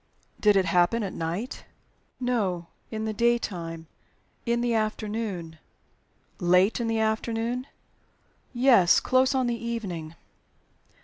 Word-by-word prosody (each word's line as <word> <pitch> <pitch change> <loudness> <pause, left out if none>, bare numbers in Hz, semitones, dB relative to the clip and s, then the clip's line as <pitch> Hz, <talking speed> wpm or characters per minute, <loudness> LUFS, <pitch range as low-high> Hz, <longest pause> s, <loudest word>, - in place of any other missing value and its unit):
"Did 210 -1 +4
it 190 -1 +3
happen 180 +6 +2
at 195 - -4
night?" 175 - -4 0.6
"No. 210 -9 -1 0.2
In 220 -1 -4
the 220 - -2
daytime 190 -8 -1 0.6
in 235 0 +1
the 240 -1 +1
afternoon." 215 -6 -3 0.8
"Late 180 +5 +3
in 235 - -1
the 225 0 0
afternoon?" 225 +3 -1 0.8
"Yes 240 -8 +5
close 260 +1 +2
on 260 -1 +2
the 235 -1 -2
evening." 180 -9 -4
220 Hz, 115 wpm, -26 LUFS, 180-235 Hz, 0.8 s, Yes